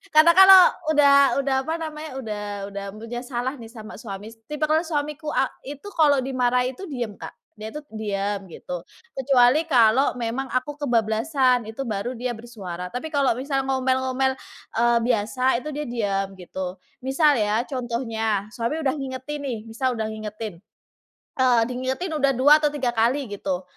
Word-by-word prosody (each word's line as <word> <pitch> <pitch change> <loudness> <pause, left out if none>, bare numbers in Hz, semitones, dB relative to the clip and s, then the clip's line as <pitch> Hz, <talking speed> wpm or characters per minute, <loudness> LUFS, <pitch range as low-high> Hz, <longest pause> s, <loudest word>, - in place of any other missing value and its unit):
karna 310 +2 +8
kalau 380 +2 +9 0.4
udah 285 -1 +6 0.3
udah 270 -1 +1
apa 320 - 0
namanya 310 0 -6
udah 210 -1 -4 0.3
udah 200 0 -5
punya 230 +2 -6
salah 250 +1 -3
nih 230 - -9
sama 220 -3 -10
suami, 220 +1 -8
tipikal 305 +1 +1
suamiku 300 -1 -3
e 270 +1 -2
itu 350 +9 -13
kalau 290 -6 +3
dimarahi 250 -1 +1
itu 385 +9 -9
diem 245 -7 -4
Kak, - - -8 0.3
dia 215 - -6
itu 300 - -4
diem 205 -2 -2
gitu 180 +1 -7 0.4
kecuali 265 +3 +4
kalau 250 -1 +4
memang 245 +2 -3
aku 285 +3 -2
kebablasan 245 0 +1
itu 225 +5 -5
baru 230 +1 -3
dia 245 +1 -3
bersuara. 205 -7 -7
Tapi 280 +6 -5
kalau 280 -6 +2
misal 270 +1 -2
ngomel-ngomel 260 0 +1 0.5
e 235 - +3 0.2
biasa 240 +2 +1
itu 300 - -9
dia 300 - -2
diem 200 -5 -1
gitu. 185 +1 -6 0.3
Misal 290 +3 +3
ya 215 +2 +1
contohnya, 230 -5 -2
suami 235 +7 -2
udah 265 -2 +1
ngingetin 270 +1 -5
nih, 250 -5 -3
misal 245 +3 -1
udah 220 -1 -1
ngingetin. 215 -1 -6 0.9
E - - +5 0.2
diingetin 260 +8 -3
udah 275 -1 +3
dua 290 +4 +7
atau 300 - +3
tiga 265 -4 -1
kali 245 +4 +1
gitu, 190 -2 -3
250 Hz, 160 wpm, -24 LUFS, 220-280 Hz, 0.9 s, kalau